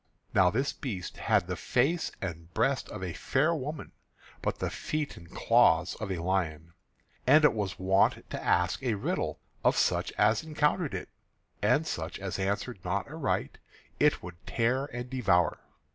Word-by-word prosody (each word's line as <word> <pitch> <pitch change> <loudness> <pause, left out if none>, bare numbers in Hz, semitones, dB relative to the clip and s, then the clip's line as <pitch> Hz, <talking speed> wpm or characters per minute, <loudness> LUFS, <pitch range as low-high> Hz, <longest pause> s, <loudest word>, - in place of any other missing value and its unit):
Now 90 -1 +5
this 135 +9 0
beast 100 -9 -5
had 105 -5 +2
the 90 0 -3
face 140 - +1
and 85 -2 -6
breast 130 +4 +1
of 95 - -6
a 90 -3 -3
fair 150 - +1
woman, 150 0 -5 0.5
but - - -1
the - - -2
feet 150 -1 -3
and 85 -1 -13
claws 80 +2 +3
of 110 -3 -4
a 95 - -1
lion; 85 -3 -1 0.5
and 150 +3 +7
it 140 - +5
was 105 -4 -3
wont 95 +1 +2
to - - -4
ask 90 +6 +2
a 125 -5 0
riddle 100 - -2 0.3
of - - +3
such - - +1
as 105 +1 +3
encountered 155 +1 0
it; - - -5 0.5
and 125 +9 +3
such 80 - -4
as 95 -1 -4
answered 100 +3 -2
not 95 +2 -1
aright 155 -2 -2 0.4
it - - +3
would 85 0 -10
tear 125 +4 +1
and 125 -2 -7
devour. 95 - +2
105 Hz, 165 wpm, -29 LUFS, 90-135 Hz, 0.5 s, and